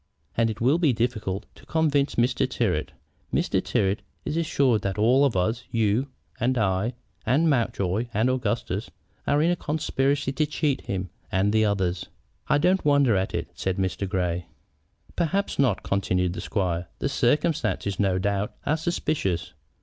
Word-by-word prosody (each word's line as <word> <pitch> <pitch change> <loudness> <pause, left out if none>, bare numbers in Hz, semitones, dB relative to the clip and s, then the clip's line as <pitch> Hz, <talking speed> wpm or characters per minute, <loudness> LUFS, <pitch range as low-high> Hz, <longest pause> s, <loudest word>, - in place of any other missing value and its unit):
And 115 0 +2
it 110 - -5
will 135 +8 +3
be 155 -7 +3
difficult 110 -5 -2
to - - -18
convince 150 -3 +1
Mr. 125 +2 +2
Tyrrwhit. 95 -12 0 0.4
Mr. - - +1
Tyrrwhit 100 +2 +1 0.3
is 150 - -2
assured 140 -9 +2
that 100 -1 -2
all 125 +6 +4
of 120 -8 +1
us, 110 +7 0
you 115 +3 +1 0.3
and 130 +2 +1
I, 105 +2 +1 0.3
and 140 +9 +3
Mountjoy 115 - +1
and 115 +2 +1
Augustus, 115 -4 -1 0.4
are 145 +1 +3
in 170 - +3
a - - +2
conspiracy 145 -3 0
to 150 +3 0
cheat 150 -2 0
him 95 -2 -3 0.2
and 100 +2 +2
the 110 0 +4
others." 95 -3 0 0.4
"I 145 - +4
don't 180 +5 +2
wonder 140 -6 +4
at 95 0 -1
it," - - -3
said 95 0 -2
Mr. 95 0 -1
Grey. 90 -3 -1 0.7
"Perhaps 180 +2 0
not," 125 -8 +2
continued 90 -2 0
the - - -5
squire; 90 -3 -1
"the - - -1
circumstances, 140 - 0
no 95 -3 +2
doubt, 100 +2 -1
are 150 +2 +2
suspicious. 95 - -1
115 Hz, 160 wpm, -25 LUFS, 95-140 Hz, 0.7 s, all